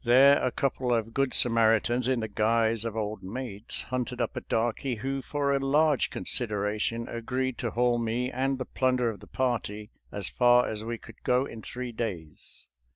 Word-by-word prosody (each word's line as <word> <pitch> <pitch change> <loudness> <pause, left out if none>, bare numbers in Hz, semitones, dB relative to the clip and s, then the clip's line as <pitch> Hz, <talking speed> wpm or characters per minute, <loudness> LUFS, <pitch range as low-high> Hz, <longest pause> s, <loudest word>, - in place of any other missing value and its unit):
There 130 +4 +6
a - - +2
couple 130 -2 -1
of 115 -1 0
good 135 0 +1
Samaritans 115 +1 +3
in 130 -3 +1
the 110 - -2
guise 110 +1 +1
of 115 -1 -4
old 105 -2 -3
maids 110 +1 -5
hunted 125 -2 -3
up - - -1
a - - -3
darky 120 +3 -1
who 135 +4 -3
for 140 +1 -1
a - - +1
large 145 +1 +3
consideration 110 +1 -1
agreed 130 +2 -3
to 120 - -1
haul 120 +2 +2
me 120 +3 -1
and 135 +1 0
the 130 - -4
plunder 125 -2 +1
of 105 - -10
the - - -14
party 115 -4 -2 0.2
as 100 -2 -4
far 125 0 +4
as 110 0 -4
we 115 +1 -4
could 115 0 -15
go 125 +2 +2
in 115 -5 -9
three 125 +2 -5
days. 95 -10 -6
120 Hz, 185 wpm, -28 LUFS, 110-130 Hz, 0.2 s, There